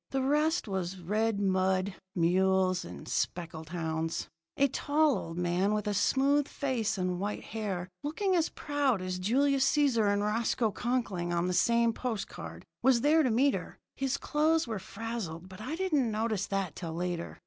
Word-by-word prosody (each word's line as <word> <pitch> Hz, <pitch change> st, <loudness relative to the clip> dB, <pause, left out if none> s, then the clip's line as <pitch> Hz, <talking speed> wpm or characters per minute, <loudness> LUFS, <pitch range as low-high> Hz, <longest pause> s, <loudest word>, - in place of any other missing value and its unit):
The 270 Hz, -1 st, -1 dB
rest 300 Hz, +2 st, +2 dB
was 190 Hz, -2 st, -3 dB
red 210 Hz, +4 st, 0 dB
mud, 190 Hz, 0 st, +1 dB, 0.2 s
mules, 185 Hz, +1 st, +2 dB
and -, -, -9 dB
speckled 165 Hz, -2 st, -3 dB
hounds. 160 Hz, -1 st, -2 dB, 0.3 s
"A 280 Hz, -, +5 dB
tall 290 Hz, +2 st, +2 dB
old 165 Hz, +1 st, -5 dB
man, 180 Hz, +4 st, +1 dB
with 210 Hz, -, -2 dB
a 210 Hz, -, 0 dB
smooth 275 Hz, +7 st, +3 dB
face 245 Hz, -8 st, -1 dB
and 180 Hz, -1 st, -1 dB
white 205 Hz, +2 st, -3 dB
hair, 200 Hz, -5 st, -4 dB
looking 370 Hz, +6 st, 0 dB
as 330 Hz, -2 st, +2 dB
proud 280 Hz, -9 st, 0 dB
as 185 Hz, 0 st, -3 dB
Julius 270 Hz, +7 st, +3 dB
Cæsar 245 Hz, -8 st, +3 dB
and 205 Hz, 0 st, +1 dB
Roscoe 220 Hz, +1 st, +1 dB
Conkling 215 Hz, -8 st, -1 dB
on 170 Hz, 0 st, +1 dB
the 180 Hz, -, 0 dB
same 235 Hz, +5 st, +3 dB
post 225 Hz, -3 st, -3 dB
card, -, -, -9 dB, 0.2 s
was 250 Hz, -2 st, +4 dB
there 310 Hz, +4 st, +5 dB
to 265 Hz, -, +2 dB
meet 265 Hz, +5 st, +3 dB
her. -, -, -5 dB, 0.2 s
His 270 Hz, 0 st, -1 dB
clothes 310 Hz, +3 st, +2 dB
were 220 Hz, -3 st, -3 dB
frazzled, 200 Hz, -5 st, -5 dB
but 190 Hz, +2 st, -11 dB
I 260 Hz, +8 st, -3 dB
didn't 310 Hz, -9 st, +1 dB
notice 215 Hz, -2 st, -1 dB
that 195 Hz, -3 st, -2 dB
till 165 Hz, -3 st, -5 dB
later. 175 Hz, 0 st, -3 dB
215 Hz, 170 wpm, -30 LUFS, 185-270 Hz, 0.3 s, A